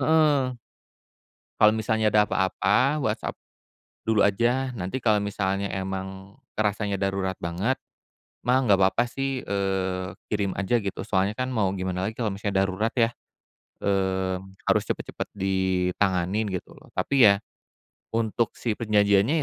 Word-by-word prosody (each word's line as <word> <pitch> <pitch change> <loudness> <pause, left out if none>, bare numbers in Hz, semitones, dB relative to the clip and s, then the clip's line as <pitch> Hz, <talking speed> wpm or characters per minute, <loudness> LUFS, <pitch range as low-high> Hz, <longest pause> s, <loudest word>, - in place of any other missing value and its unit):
heeh. 155 -3 +4 1.2
Kalau 105 0 +7
misalnya 110 0 +1
ada 105 - +6
apa-apa 105 +9 +2
WhatsApp 110 -4 -1 0.7
dulu 110 -1 +1
aja, 120 +6 +2
nanti 95 +5 -3
kalau 110 -4 +2
misalnya 100 -1 -1
emang 95 0 -5 0.2
kerasanya 105 -1 -1
darurat 95 -1 -1
banget, 90 +10 -1 0.7
mah, 125 +2 +4
enggak 105 -7 +4
papa 120 +6 +1
sih, 135 0 -2
eee, 95 -2 -2 0.2
kirim 100 -3 0
aja 100 +5 +1
gitu. 100 -4 -3
Soalnya 100 -1 +1
kan 130 +3 -2
mau 105 -7 +1
gimana 95 -1 -2
lagi 110 - -2
kalau 115 -1 -1
misalnya 100 -1 0
darurat 100 +4 -1
ya. 115 -2 +4 0.7
Mmm, 95 -1 -1
harus - - +4
cepet-cepet - - -4
ditanganin 95 +1 0
gitu 90 - -5
loh. - - -17
Tapi 135 -4 +4
ya, 100 - +6 0.8
untuk 115 0 0
si 115 - -1
perjanjiannya 105 +6 +3
100 Hz, 135 wpm, -26 LUFS, 95-115 Hz, 1.2 s, Kalau